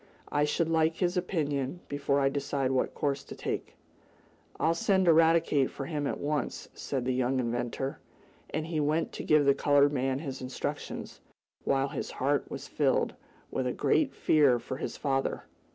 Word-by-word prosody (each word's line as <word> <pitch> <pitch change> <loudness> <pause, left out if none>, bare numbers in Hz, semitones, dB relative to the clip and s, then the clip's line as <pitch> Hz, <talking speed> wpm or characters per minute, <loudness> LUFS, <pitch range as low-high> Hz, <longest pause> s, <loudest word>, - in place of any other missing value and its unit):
I 145 0 +3
should 160 +2 0
like 160 0 +2
his 180 +1 0
opinion 155 -4 -1
before 140 0 0
I 135 - +3
decide 140 -1 -1
what 130 - 0
course 140 -2 -1
to - - -9
take." - - -4 0.8
"I'll 165 - +3
send 190 +2 +2
Eradicate 160 -4 +4
for 135 - -6
him 145 -1 -2
at - - -3
once," 145 -2 -2
said 130 -3 -3
the 130 - +1
young 130 +1 +1
inventor, 120 +2 -2 0.5
and 155 - -2
he 160 -1 -2
went 150 +2 +1
to - - -6
give 150 -2 +4
the 140 - +6
colored 145 +1 +4
man 130 -1 0
his 135 -3 -5
instructions, 130 0 -5 0.4
while 135 0 +2
his 140 - -4
heart 140 +1 0
was - - -6
filled - - +1 0.4
with 130 -1 -1
a 125 - -1
great 290 -4 +1
fear 145 -5 +4
for 120 +2 -6
his - - -5
father. 135 -2 -1
145 Hz, 170 wpm, -29 LUFS, 135-155 Hz, 0.8 s, the